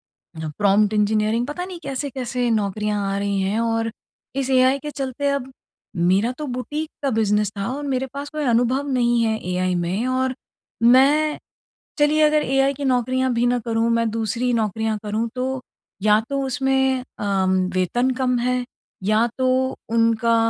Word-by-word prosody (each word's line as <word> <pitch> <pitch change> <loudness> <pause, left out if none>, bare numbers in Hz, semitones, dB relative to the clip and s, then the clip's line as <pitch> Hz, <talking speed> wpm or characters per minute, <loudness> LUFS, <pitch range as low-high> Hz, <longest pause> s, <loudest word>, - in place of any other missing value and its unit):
अ, 160 -1 -9
prompt 205 +1 +3
engineering, 215 +2 +1
पता 300 +6 -4
नहीं 365 -1 -8
कैसे-कैसे 255 -3 -3
नौकरियाँ 210 -1 0
आ - - -1
रही 200 -1 -1
हैं, 200 +4 0
और 225 0 0 0.5
इस 270 -1 -1
एआई 260 +1 +4
के 295 +1 -6
चलते 275 0 -3
अब 280 -2 -2 0.5
मेरा 190 +7 +2
तो 305 - -4
बुटीक 290 +5 -4
का 275 - +1
बिज़नेस 210 -3 +1
था 195 - -2
और 290 - -5
मेरे 265 -1 -1
पास 285 +1 -5
कोई 305 -1 -3
अनुभव 250 +3 +1
नहीं 240 -2 +2
है 220 -1 0
एआई 180 0 0
में। 180 +7 -1
और 260 0 0 0.5
मैं, 280 +6 +5 0.6
चलिए 295 +1 +3
अगर 300 0 +4
एआई 270 +1 +2
की 280 +1 -5
नौकरियाँ 255 0 +1
भी 235 +1 +1
ना 245 0 +2
करूँ, 230 0 +1
मैं 230 -1 +2
दूसरी 230 +3 -1
नौकरियाँ 220 0 0
करूँ, 215 +2 -1
तो 260 +1 -2 0.4
या 210 +1 +5
तो 275 0 -1
उसमें 265 -1 +1 0.2
अम 195 -2 +1 0.2
वेतन 240 +8 +1
कम 250 -1 +2
है, 250 +1 0 0.4
या 215 +3 +3
तो 260 0 +1
उनका 230 0 +2
245 Hz, 165 wpm, -22 LUFS, 215-265 Hz, 0.6 s, मैं